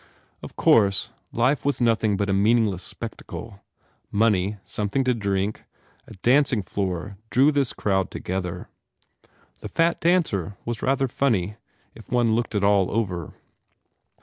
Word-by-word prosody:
Of - - -10
course, 100 -3 +3 0.2
life 130 +5 +1
was 140 -2 0
nothing 110 -4 +2
but 100 0 0
a 100 - +1
meaningless 105 -2 +2
spectacle. 110 0 -8 0.5
Money, 105 -2 +1
something 105 +6 -1
to 130 -1 +2
drink, 100 -2 -2 0.4
a - - -11
dancing 130 -4 +3
floor 95 0 -3
drew 135 +4 +4
this 140 -4 +1
crowd 95 -2 0
together. 90 -1 -4 0.9
The - - -7
fat 165 +1 +1
dancer 115 - +1
was 115 -2 -4
rather 135 0 +1
funny, 110 -7 0 0.4
if 115 - -15
one 120 -2 +3
looked 115 0 -1
it 100 - +1
all 100 -2 +3
over. 90 -7 -2
105 Hz, 135 wpm, -24 LUFS, 100-120 Hz, 0.9 s, drew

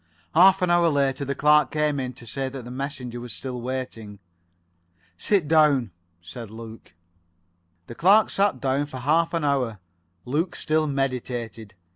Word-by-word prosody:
Half 190 +3 +6
an 175 - +2
hour 175 -1 +4
later 140 -2 0
the 140 +1 -3
clerk 150 +1 +4
came 150 -2 0
in 130 -1 -4
to 120 - -13
say 135 +4 -3
that 130 -2 -8
the 120 - -8
messenger 125 -2 -5
was 120 -1 -6
still 125 -2 -6
waiting. 120 -5 -5 1.0
"Sit 180 - +1
down," 145 -8 +3 0.3
said 105 +6 -9
Luke. 110 -4 -11 0.9
The - - -9
clerk 195 - +4
sat 195 -9 +1
down 135 +2 0
for 135 - -8
half 155 +6 +1
an 165 - -1
hour. 130 -6 0 0.5
Luke 160 +7 -1
still 155 0 0
meditated. 120 -6 -3
135 Hz, 155 wpm, -24 LUFS, 120-150 Hz, 1.0 s, Half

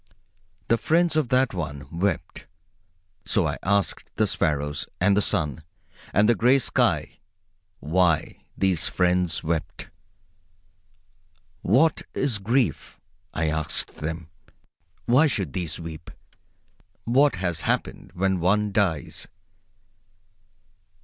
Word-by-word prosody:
The 115 - +2
friends 170 +1 +2
of 155 -5 +2
that 130 0 +2
one 75 -6 -5
wept. 85 -1 -2 0.8
So - - +1
I - - -2
asked 100 +1 0
the - - +2
sparrows, 75 -1 -1
and 100 +2 +3
the 105 - +3
sun, 75 -6 0 0.5
and 105 +1 +3
the 120 - +5
gray 125 +4 +4
sky 135 - 0 0.6
why 85 0 +1
these 95 -4 +2
friends 90 -3 +1
wept. 80 0 -3 1.7
What 140 - +3
is 130 -6 0
grief? 115 - -1 0.3
I 80 -1 -1
asked 80 0 0
of - - -24
them. 80 +1 -5 0.8
Why 130 +7 +5
should 95 - -2
these 85 -4 -4
weep? 80 -1 -8 0.9
What 135 +5 +3
has 90 -3 -1
happened - - -2
when 95 0 +1
one 105 +4 +2
dies? 95 -7 -1
90 Hz, 110 wpm, -25 LUFS, 80-115 Hz, 1.7 s, the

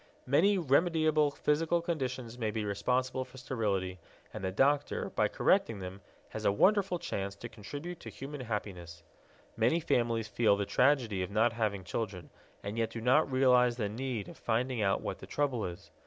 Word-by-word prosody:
Many 185 +10 +4
remediable 155 -1 +3
physical 160 +4 +1
conditions 130 -8 -3
may 110 -2 0
be 105 0 -2
responsible 125 +6 0
for 130 0 -15
sterility, 100 -8 -2 0.3
and - - -6
the 95 - -1
doctor, 140 +8 +1
by - - +2
correcting 115 - +2
them, 95 +1 -7 0.3
has - - -6
a - - +4
wonderful 190 - +3
chance 100 - -4
to 120 - -8
contribute 145 - -8
to - - -9
human 140 +1 -7
happiness. 90 -7 -5 0.5
Many 120 +9 +2
families 115 -7 0
feel 105 -2 +3
the 100 - -1
tragedy 125 -6 +2
of 90 - -3
not 110 +3 +2
having 105 -4 -1
children, 90 -2 -4 0.3
and 105 +3 -4
yet 115 -1 +1
do 115 - -6
not 130 +5 +3
realize 125 -2 +4
the 105 -4 -1
need 120 -1 -4
of - - -11
finding 120 +1 0
out 95 -1 +1
what - - -4
the - - -10
trouble 135 -6 -1
is. 85 -1 -10
120 Hz, 175 wpm, -31 LUFS, 105-140 Hz, 0.5 s, Many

